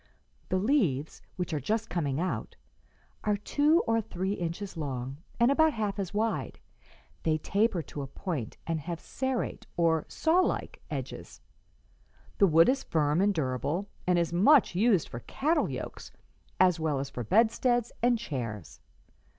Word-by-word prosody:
The 185 - +1
leaves, 185 - +1
which 180 -2 -3
are 150 - 0
just 220 - -1
coming 150 -8 -1
out, 185 +2 -3 0.7
are 210 -1 +1
two 295 - +3
or 225 0 +2
three 190 -1 -3
inches 180 +1 -4
long 135 -4 -4 0.2
and 235 +3 +5
about 315 +2 +4
half 210 -2 -2
as 190 -3 -3
wide; 220 +2 -1 0.6
they 155 -1 +1
taper 200 +2 +1
to 145 - -7
a 135 - -5
point 140 - -5
and 165 -1 -1
have 170 +2 -5
serrate, 260 -2 -3
or 165 -2 +2
sawlike, 350 +3 +1
edges. - - -6 1.0
The 200 - +6
wood 165 0 +6
is 270 +1 +2
firm 150 +1 +1
and 205 +1 +4
durable, 155 - -2 0.2
and 180 -1 +4
is 170 0 0
much 225 - +5
used 195 -2 +3
for 120 - -7
cattle 300 - 0
yokes - - -6 0.5
as 180 -2 +4
well 155 -3 0
as 135 0 -4
for 125 - -4
bedsteads 230 - +2
and 240 0 +3
chairs. 115 - -5
185 Hz, 150 wpm, -29 LUFS, 155-225 Hz, 1.0 s, The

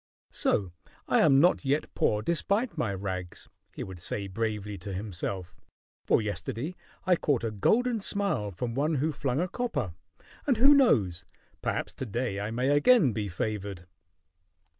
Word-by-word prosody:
"So 95 -4 +1 0.4
I - - +3
am 135 -3 +6
not 175 +2 +4
yet 140 +2 0
poor, 105 0 +1
despite 200 - 0
my 110 - -1
rags," 95 -2 -5 0.3
he - - -4
would 95 -2 -8
say 100 +4 -2
bravely 105 0 -3
to 100 +3 -7
himself. 95 -2 -4 0.5
"For - - +3
yesterday 105 - -4 0.3
I 185 -1 +5
caught 140 -7 0
a 115 - -1
golden 230 - +2
smile 200 - 0
from 115 +5 -4
one 150 +5 +1
who 150 +3 +1
flung 135 -2 -1
a 180 - +1
copper; 180 - -2 0.5
and 260 -5 +3
who 270 +5 +7
knows? 110 - +3 0.4
Perhaps - - -2
to 130 - -5
day 115 -2 -2
I 100 +1 -3
may 125 +4 0
again 145 - +5
be 105 -1 -2
favored." 100 -1 -4
115 Hz, 160 wpm, -28 LUFS, 100-160 Hz, 0.5 s, who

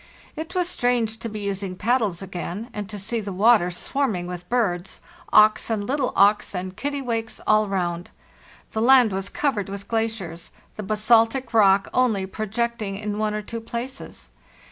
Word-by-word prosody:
It 325 +4 -6
was 360 -1 +1
strange 240 -7 0
to 230 - -4
be 210 -1 -6
using 195 -2 -3
paddles 215 -4 0
again 190 +5 -6
and 210 -1 -5
to 210 - -6
see 215 +4 -2
the 205 -2 -5
water 200 -1 +4
swarming 200 0 -1
with 180 0 -7
birds—auks 215 0 +1
and 215 -3 -1
little 270 +2 0
auks 205 0 +3
and 185 +1 -4
kittiwakes 245 -5 -3
all 215 0 +4
round. 175 -3 -2 0.6
The 220 - -2
land 250 -2 +6
was 195 +1 -3
covered 220 -10 -1
with 200 0 -7
glaciers, 220 -7 -3 0.2
the - - -5
basaltic 225 +4 +2
rock 195 -3 +5
only 225 -7 +2
projecting 215 0 -3
in 210 0 -4
one 215 -1 0
or 210 - -3
two 230 +2 -6
places. 235 +4 -7
215 Hz, 160 wpm, -23 LUFS, 195-235 Hz, 0.6 s, land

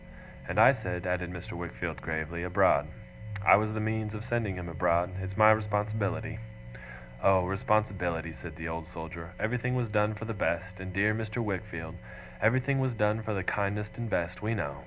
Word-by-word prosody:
'And - - 0
I - - +9
said' 90 -1 -4
added 90 -1 -1
Mr. 90 0 -7
Wickfield 85 -1 -5
gravely, 80 +1 -3
'abroad. 90 0 +3 0.6
I - - +9
was 110 +1 +2
the - - -1
means 110 0 -1
of 105 +1 -6
sending 115 -5 -1
him 90 -1 -5
abroad. 85 +2 +1
It's 95 +1 -5
my 110 0 +8
responsibility.' 110 0 0 0.8
'Oh! 95 -2 +5
Responsibility!' 95 -5 0
said 80 0 -9
the 80 0 -5
Old 80 0 -4
Soldier. 85 +1 -8
'Everything 125 +3 0
was 120 -3 0
done 105 0 +2
for 110 - -6
the 115 - -3
best, 95 -1 -2
my 95 - -6
dear 100 +3 +2
Mr. 110 0 -4
Wickfield; 85 -5 -4 0.4
everything 130 +5 +3
was 130 -2 0
done 105 +1 +2
for 110 -1 -2
the 95 - -1
kindest 105 +2 -1
and 120 -1 -3
best, 90 -1 -1
we 110 +2 0
know. 70 -8 -3
100 Hz, 180 wpm, -30 LUFS, 90-110 Hz, 0.8 s, I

